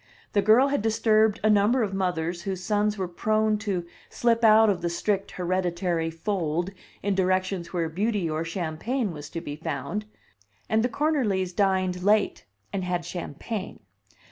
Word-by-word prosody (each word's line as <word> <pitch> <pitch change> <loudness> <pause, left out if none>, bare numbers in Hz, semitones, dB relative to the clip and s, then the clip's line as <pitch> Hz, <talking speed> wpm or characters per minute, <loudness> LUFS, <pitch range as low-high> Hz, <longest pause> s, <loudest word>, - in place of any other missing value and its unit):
The 205 - +4
girl 225 +7 +5
had 285 -5 0
disturbed 220 -1 +3
a 215 - +4
number 210 +5 +4
of 200 -2 -2
mothers 175 -2 -1
whose 185 0 -4
sons 210 +2 +1
were 190 -2 -2
prone 215 +4 +1
to 195 -5 -2 0.2
slip 235 -1 +1
out 220 0 +7
of 190 -4 +1
the 170 - -1
strict 195 +3 -1
hereditary 175 -2 -1
fold 170 0 -2 0.3
in 200 0 +1
directions 185 -2 0
where 170 -3 -1
beauty 200 +2 -1
or 155 +1 -1
champagne 180 +8 -2
was 150 -2 -8
to 165 - -5
be 145 -3 -6
found; 160 +6 -4 0.6
and 220 0 +2
the 245 - +1
Cornerlys 220 - 0
dined 185 -2 +1
late, 205 +2 +2 0.3
and 195 -2 -1
had 180 -2 -2
champagne. 185 +4 -5
190 Hz, 160 wpm, -26 LUFS, 175-215 Hz, 0.6 s, out